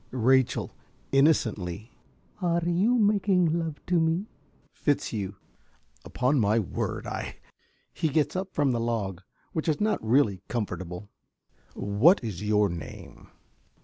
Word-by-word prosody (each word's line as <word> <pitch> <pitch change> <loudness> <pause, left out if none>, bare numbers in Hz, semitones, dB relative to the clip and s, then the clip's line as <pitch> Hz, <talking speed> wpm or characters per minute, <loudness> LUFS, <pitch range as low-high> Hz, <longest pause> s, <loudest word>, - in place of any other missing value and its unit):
~Rachel~ 130 +1 +2 0.4
(innocently). 110 - +1 0.5
Are 170 -1 +1
you 195 +8 +3
making 195 -6 +3
love 160 -3 -5
to 180 -1 +2
me? 165 +4 +1 0.5
~Fitzhugh.~ 105 -9 -1 0.7
Upon 130 +3 +1
my 110 0 +3
word 105 -6 -2
I - - -5 0.6
(He 160 - 0
gets 150 +3 +1
up 190 +1 -3
from 145 -2 +2
the 120 - 0
log, 105 -6 -2 0.3
which 160 - -2
is 150 - +1
not 210 - 0
really 110 -5 +2
comfortable.) 100 -4 -4 0.6
What 110 - +4
is 105 -6 -5
your 105 -1 +3
name? 85 -3 -9
130 Hz, 120 wpm, -27 LUFS, 105-170 Hz, 0.7 s, What